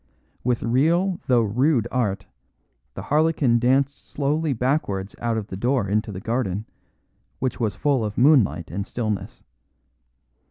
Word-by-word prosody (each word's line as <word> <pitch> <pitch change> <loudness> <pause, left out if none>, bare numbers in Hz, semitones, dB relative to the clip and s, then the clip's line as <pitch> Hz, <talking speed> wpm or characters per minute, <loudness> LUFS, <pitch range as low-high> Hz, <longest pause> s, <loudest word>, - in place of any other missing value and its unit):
With 125 -1 0
real 165 +10 +2
though 120 -3 +4
rude 120 +3 +1
art, 100 -6 -1 0.7
the - - -6
harlequin 150 -5 +2
danced 135 +3 +1
slowly 150 +2 0
backwards 115 -7 -1
out 115 -1 -1
of 110 - -3
the 95 - -7
door 120 +2 0
into 105 +2 0
the 95 - -6
garden, 110 -2 -2 0.7
which 130 0 -2
was 110 -5 -1
full 140 -5 +1
of 105 -1 -4
moonlight 120 - +3
and 100 +3 -4
stillness. 110 -4 -4
120 Hz, 135 wpm, -23 LUFS, 105-140 Hz, 0.7 s, though